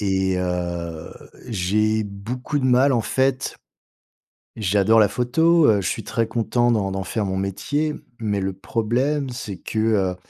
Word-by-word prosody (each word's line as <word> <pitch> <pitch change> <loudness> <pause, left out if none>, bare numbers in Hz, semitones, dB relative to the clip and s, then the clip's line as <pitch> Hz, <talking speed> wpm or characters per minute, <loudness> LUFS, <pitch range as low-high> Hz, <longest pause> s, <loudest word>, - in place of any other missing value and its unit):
Et 95 -2 +1
heu, 85 -2 -3 0.4
j'ai 110 +1 +1
beaucoup 115 +8 -4
de 130 - -2
mal 130 +2 +4
en 120 - +2
fait 130 +3 0 1.0
J'adore 105 +1 +3
la 105 - +6
photo, 160 - +3
heu, 105 -2 +4
je 90 - -2
suis - - -3
très 115 -1 -1
content 120 +1 +1
d'en 100 -4 0
d'en 95 0 -3
faire 110 +1 -2
mon 95 -1 -2
métier, 145 +11 -1 0.2
mais 105 -3 -1
le 95 0 -2
problème, 125 +8 -1
c'est 105 -6 -6
que, 110 - -4
heu, 105 -4 +1
110 Hz, 155 wpm, -22 LUFS, 95-125 Hz, 1.0 s, la